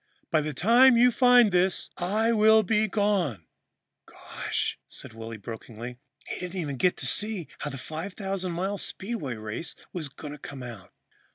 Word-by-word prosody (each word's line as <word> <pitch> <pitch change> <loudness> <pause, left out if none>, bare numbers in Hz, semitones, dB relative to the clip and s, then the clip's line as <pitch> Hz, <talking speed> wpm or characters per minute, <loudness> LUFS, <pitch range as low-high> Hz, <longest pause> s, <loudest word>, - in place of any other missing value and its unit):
By 155 - +3
the 155 +1 -3
time 235 - +6
you 245 +1 +6
find 245 -3 +6
this, 180 +1 +1
I 215 +6 +1
will 220 0 +5
be 215 +2 +2
gone.'" 190 - 0 0.6
"Gosh," - - -4
said - - -9
Willy 115 0 -7
brokenly, 115 +2 -8 0.3
"he - - -5
didn't 180 +1 -4
even 145 -5 -3
get 180 +6 +2
to - - -4
see 210 -6 +1
how 150 - -3
the 135 - -6
5000 185 +5 -4
mile 190 +4 -2
Speedway 190 - -3
Race 110 +9 -5 0.2
was 160 -5 -4
going 145 +1 -9
to 150 - -10
come 135 -2 -8
out." 115 -6 -9
180 Hz, 165 wpm, -27 LUFS, 135-210 Hz, 0.6 s, time